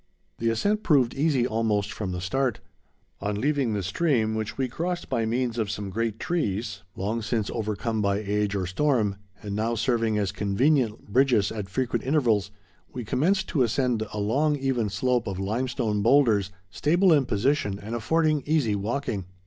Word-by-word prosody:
The 115 - +1
ascent 205 - +1
proved 135 - +3
easy 140 -4 +2
almost 110 -3 0
from 100 -4 -4
the 90 -1 -4
start. 125 +6 0 0.6
On 105 +1 -2
leaving 140 -2 +1
the 100 -2 -2
stream, 110 - +1
which 110 -1 -3
we 135 -1 0
crossed 170 +7 -3
by 115 -4 0
means 120 0 -1
of 110 -3 -1
some 100 -1 -4
great 115 +1 -2
trees, 105 - -2
long 110 +4 -2
since 110 -1 -1
overcome 110 +1 -2
by 100 -1 +1
age 105 0 -1
or 95 -2 -1
storm, 105 -1 +1 0.3
and 100 -1 -4
now 115 +2 0
serving 115 -2 +1
as 100 -2 0
convenient 115 +4 +1
bridges 120 -2 +3
at 105 -3 -5
frequent 125 +5 -1
intervals, 120 -8 +2 0.4
we 125 -3 -6
commenced 190 - +1
to 145 - +1
ascend 125 -1 +1
a - - -6
long, 140 +9 +1
even 130 -6 0
slope 125 +3 0
of 95 -2 -3
limestone 110 +1 -1
boulders, 115 -5 +4 0.2
stable 170 - +3
in 140 -4 +3
position, 105 -2 +1
and 105 +3 -7
affording 155 +6 +1
easy 145 -9 +2
walking. 105 -1 -2
115 Hz, 170 wpm, -26 LUFS, 105-135 Hz, 0.6 s, boulders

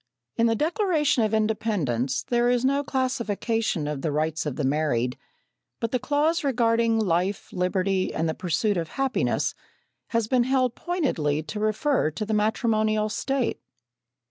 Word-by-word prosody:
In 230 - +3
the 225 - +2
Declaration 305 - +1
of 215 - +1
Independence 205 - 0
there 240 0 +1
is 245 0 +2
no 280 +2 +2
classification 230 - -1
of 150 -2 -3
the 155 - -1
rights 155 +1 -1
of 140 - -3
the 150 - -2
married, 130 -4 0 0.6
but 230 -1 -2
the 255 - +1
clause 300 +5 +1
regarding 230 -3 +2
"life, 190 -1 0
liberty, 185 +1 0
and 165 - -1
the 160 - 0
pursuit 190 +4 0
of 165 -2 -2
happiness" 270 -1 0 0.5
has 230 -2 0
been 245 0 +2
held 255 -2 +2
pointedly 165 - -1
to 210 +7 -6
refer 215 - +1
to 215 +8 -4
the 215 - -2
matrimonial 215 0 +1
state. 270 +3 -1
220 Hz, 150 wpm, -25 LUFS, 170-255 Hz, 0.6 s, In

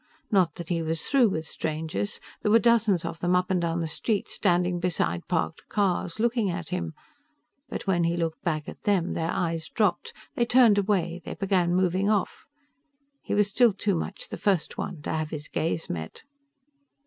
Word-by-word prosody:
Not 185 -6 +3
that 170 -2 -7
he 170 -2 0
was 160 0 -1
through 260 -5 +4
with 160 -4 -3
strangers. 160 +7 -3 0.2
There 210 - +1
were 220 - +7
dozens 225 -6 +3
of 165 - -5
them 180 +1 +2
up 180 +1 +1
and 180 -2 +2
down 170 0 -1
the 165 - -1
street, 205 +6 -1
standing 175 0 +1
beside 85 - -1
parked 165 -2 -1
cars, 195 -2 0
looking 230 -2 +1
at 170 -2 -4
him. 80 -1 -3 0.7
But - - -5
when 175 -3 +2
he 170 +1 0
looked 165 -2 -2
back 155 -3 -1
at - - -9
them, 195 -4 +1
their 165 0 -2
eyes 165 -2 -2
dropped, 230 - 0 0.2
they 240 - +1
turned 235 -5 +6
away, 180 -4 0
they - - -6
began 185 -3 +1
moving 185 +2 +2
off. 205 -3 0 0.8
He - - -2
was 205 -1 +3
still 230 +2 +4
too 200 +1 0
much 180 +3 -4
the - - -5
First 190 -6 0
One 170 -6 -5
to - - -2
have 155 -1 -2
his 150 -1 -6
gaze 160 0 -2
met. 80 -2 -6
180 Hz, 190 wpm, -27 LUFS, 165-205 Hz, 0.8 s, were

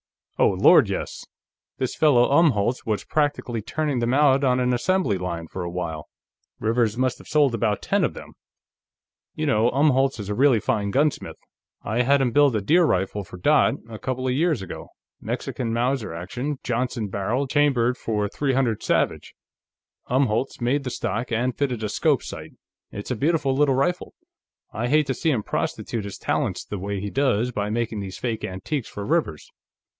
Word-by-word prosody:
"Oh - - +5
Lord, - - +5
yes! - - -5 0.5
This 130 - -2
fellow 125 -6 +4
Umholtz 130 -7 +3
was 110 -2 -2
practically 145 -6 -1
turning 145 +4 -2
them 120 +2 +1
out 140 -1 +4
on 130 -1 +3
an 125 0 +1
assembly 125 - +1
line, 85 -2 -4
for 95 - -7
a 85 - -3
while. 85 -3 -5 0.5
Rivers 115 0 +1
must 130 -1 0
have - - -15
sold 145 -5 +3
about 110 -3 0
ten - - +1
of - - 0
them. - - -10 1.0
You 155 - -2
know, 120 -5 +3
Umholtz 135 -2 +2
is 100 -1 -6
a - - 0
really 130 0 +4
fine 100 -1 -1
gunsmith; 145 +7 0 0.5
I 110 +4 0
had 140 +3 +3
him 125 -2 +1
build 140 -1 +4
a 105 - 0
deer 170 - +4
rifle 95 - 0
for 90 0 -11
Dot, 90 - +3
a 110 -2 -9
couple 130 0 -3
of 125 - +1
years 155 - +1
ago 95 - -8 0.3
Mexican 120 -3 -3
Mauser 120 -1 -1
action, 120 - -4
Johnson 120 -3 -2
barrel, 110 +8 -1
chambered 130 -4 +2
for 105 -4 -2
.300 130 -3 0
Savage; - - -1 0.7
Umholtz 125 -1 0
made 130 +4 0
the 130 - -3
stock 120 0 -3
and 120 +2 0
fitted 125 -6 -2
a 105 - -1
scope - - +1
sight - - -8 0.4
it's 100 +5 -6
a - - 0
beautiful 145 +1 +1
little 140 -1 +3
rifle. 155 +7 -1 0.6
I 120 +3 -2
hate 150 +3 +3
to 135 - -1
see 165 - -1
him 120 -8 0
prostitute 110 +1 -3
his 100 - -7
talents - - -2
the 105 - -5
way 100 +1 -3
he 100 +1 -5
does 125 -4 +1
by 105 -3 -2
making 115 -1 -2
these 95 -2 -6
fake 115 -3 -3
antiques 110 +8 -4
for 100 - -6
Rivers. 150 - -1
125 Hz, 180 wpm, -24 LUFS, 105-140 Hz, 1.0 s, Oh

